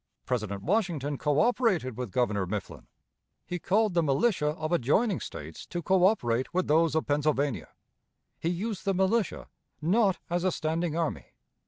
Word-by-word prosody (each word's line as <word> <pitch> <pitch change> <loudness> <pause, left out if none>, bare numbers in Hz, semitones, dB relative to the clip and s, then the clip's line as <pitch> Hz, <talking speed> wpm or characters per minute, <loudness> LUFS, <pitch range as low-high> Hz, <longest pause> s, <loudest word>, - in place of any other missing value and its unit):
President 105 -5 -2
Washington 170 -8 0
coöperated 170 - +1
with 125 -1 -4
Governor 100 -3 0
Mifflin; 100 +1 -5 0.6
he 180 - -4
called 205 +4 +2
the 170 - +3
militia 150 - +1
of 155 +1 -2
adjoining 175 - +2
States - - -8
to 175 -1 -4
coöperate 180 - +2
with 185 +1 0
those 160 0 +3
of 160 - +1
Pennsylvania. 145 -3 0 0.7
He 165 - -1
used 195 +3 -3
the 195 -1 0
militia, 190 +2 +1 0.3
not 195 +4 +2
as 175 +1 -1
a 185 - +2
standing 160 0 -1
army. 165 -3 -3
165 Hz, 145 wpm, -28 LUFS, 140-190 Hz, 0.7 s, the